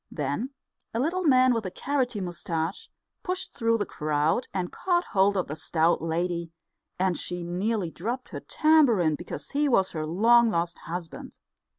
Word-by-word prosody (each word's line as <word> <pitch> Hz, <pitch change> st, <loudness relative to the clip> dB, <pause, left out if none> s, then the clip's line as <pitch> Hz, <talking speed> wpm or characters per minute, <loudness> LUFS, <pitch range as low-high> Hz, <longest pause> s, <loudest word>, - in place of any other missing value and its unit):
Then 145 Hz, -, -2 dB, 0.5 s
a -, -, +1 dB
little 335 Hz, +8 st, 0 dB
man 255 Hz, -3 st, +5 dB
with 230 Hz, -2 st, -1 dB
a 185 Hz, -, -3 dB
carroty 250 Hz, +1 st, -1 dB
moustache 175 Hz, -1 st, -3 dB, 0.3 s
pushed 365 Hz, 0 st, -4 dB
through 230 Hz, -2 st, +1 dB
the 205 Hz, -, -1 dB
crowd 155 Hz, +9 st, 0 dB
and 185 Hz, -2 st, -3 dB
caught 350 Hz, -1 st, +1 dB
hold 200 Hz, 0 st, +3 dB
of 185 Hz, -, +1 dB
the 150 Hz, -, -5 dB
stout 160 Hz, +1 st, +1 dB
lady; 170 Hz, +1 st, -2 dB, 0.5 s
and 185 Hz, -1 st, +1 dB
she 175 Hz, +1 st, -4 dB
nearly 185 Hz, +1 st, -1 dB
dropped 235 Hz, +10 st, -4 dB
her -, -, -6 dB
tambourine, 265 Hz, -, +3 dB
because 175 Hz, +4 st, -6 dB
he 290 Hz, +1 st, +1 dB
was 195 Hz, -7 st, +3 dB
her 155 Hz, -2 st, -3 dB
long 230 Hz, +7 st, +5 dB
lost 170 Hz, -3 st, -1 dB
husband. 170 Hz, -1 st, -7 dB
190 Hz, 165 wpm, -27 LUFS, 170-240 Hz, 0.5 s, man